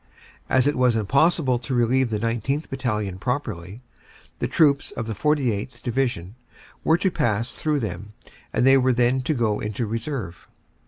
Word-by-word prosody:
As 130 -1 +3
it 145 - +2
was 125 -2 +3
impossible 130 - +2
to 130 +2 -3
relieve 120 +1 +2
the 110 - -1
19th. 115 +7 -2
Battalion 105 -8 -2
properly, 90 +4 -4 0.6
the - - 0
troops 145 -4 +3
of 115 - -5
the 110 - -3
49th. 125 -3 -1
Division 120 -7 -1 0.5
were 160 - +4
to 190 +1 +1
pass 115 -6 0
through 150 -2 -1
them 105 0 -5 0.4
and 120 - +1
they 135 0 +6
were 130 0 +3
then 125 +2 +2
to 155 +4 -1
go 110 -4 0
into 105 +3 -3
reserve. 110 - -5
120 Hz, 160 wpm, -23 LUFS, 105-135 Hz, 0.6 s, they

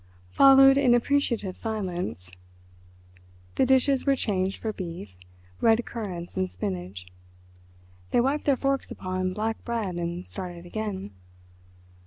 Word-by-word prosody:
Followed 270 - +7
an 250 -3 +5
appreciative 240 -7 0
silence. 180 - -4 1.2
The 255 - +2
dishes 265 +1 +3
were 275 -1 +3
changed 195 -6 -1
for 220 -1 -3
beef, 170 - -7 0.4
red 225 +1 +3
currants 185 -7 -6
and 95 -1 -1
spinach. 90 0 -5 1.0
They - - +2
wiped 275 +5 0
their 280 -2 +3
forks 275 0 -1
upon 185 0 -3
black 220 +3 -3
bread 220 -7 -3
and 175 +1 -4
started 175 -3 -6
again. 195 - -5
205 Hz, 120 wpm, -26 LUFS, 175-250 Hz, 1.2 s, Followed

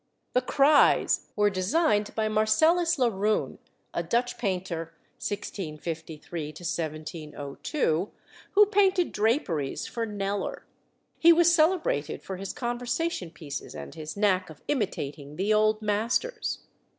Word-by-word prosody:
"The 250 - +3
Cries" 285 +3 +4
were 210 -1 +3
designed 210 - +1
by 220 -1 +1
Marcellus 315 +12 +3
Laroon, 215 -4 0 0.3
a - - 0
Dutch 245 +1 0
painter 180 -5 -3 0.2
(1653 160 -5 -5
1702), 155 - -3 0.4
who 415 +1 +7
painted 390 -3 +3
draperies 205 - 0
for 230 -1 -3
Kneller. 200 -1 -3 0.5
He 335 - +8
was 340 0 +5
celebrated 320 - +1
for 190 - -5
his 195 0 -5
conversation 240 - -2
pieces 150 -3 -7
and - - -8
his 155 +2 -7
knack 195 -4 +2
of 155 - -13
imitating 150 - -3
the 195 +6 +1
old 215 0 +3
masters. 225 - -1
210 Hz, 115 wpm, -27 LUFS, 165-250 Hz, 0.5 s, He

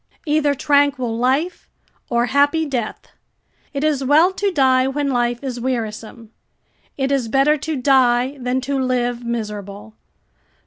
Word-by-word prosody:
["Either 295 -2 +1
tranquil 280 -4 +1
life, 265 +9 -1 0.4
or 235 0 +1
happy 285 +5 +2
death. 245 -7 -4 0.7
It 280 0 -3
is 300 -3 +1
well 310 +7 +4
to 400 +1 -1
die 260 -5 +3
when 280 +1 -1
life 240 0 -1
is 255 -3 -4
wearisome. 230 -2 -5 0.7
It 270 0 -1
is 270 -4 0
better 275 +5 +3
to 315 +2 -4
die 255 -1 +2
than 250 +1 -1
to 275 +1 -2
live 245 -1 -1
miserable." 210 -3 -6
260 Hz, 135 wpm, -20 LUFS, 240-285 Hz, 0.7 s, well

